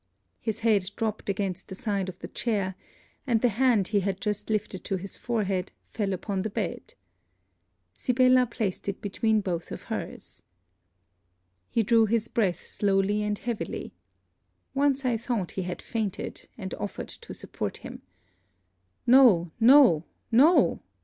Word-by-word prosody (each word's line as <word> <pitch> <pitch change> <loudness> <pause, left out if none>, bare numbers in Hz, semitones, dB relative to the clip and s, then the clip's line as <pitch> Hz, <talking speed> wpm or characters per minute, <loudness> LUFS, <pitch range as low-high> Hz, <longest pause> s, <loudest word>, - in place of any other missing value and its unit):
His 220 -1 -3
head 205 -5 +2
dropped 220 -2 -3
against 195 -2 -2
the 190 - -7
side 200 -4 -1
of 180 - -9
the - - -8
chair; 200 -5 -1 0.5
and 235 -3 +3
the 245 - +3
hand 225 -3 +2
he 205 -1 +2
had 195 -1 -2
just 210 0 -2
lifted 210 -3 -2
to 195 - -1
his 190 +1 -5
forehead 200 -6 -2 0.2
fell 205 -3 -1
upon 195 +1 -2
the 215 - -2
bed. 200 -4 -4 1.0
Sibella 255 - +3
placed 205 -4 -3
it 200 - -4
between 215 +2 +1
both 175 -4 -3
of - - -6
her's. - - -7 1.3
He 230 - +1
drew 225 +1 +4
his 230 +1 +1
breath 200 -7 0
slowly 200 +1 +1
and 210 0 -1
heavily. 235 -1 -4 0.8
Once 275 -1 +1
I 240 -2 +2
thought 225 -5 -2
he 190 - -3
had 180 0 -5
fainted, 220 -5 -4
and - - -6
offered - - -5
to - - -11
support - - -4
him. - - -9 1.0
'No! 235 -10 +6
no! 240 - +7 0.3
no!' 285 +10 +5
210 Hz, 145 wpm, -27 LUFS, 195-235 Hz, 1.3 s, no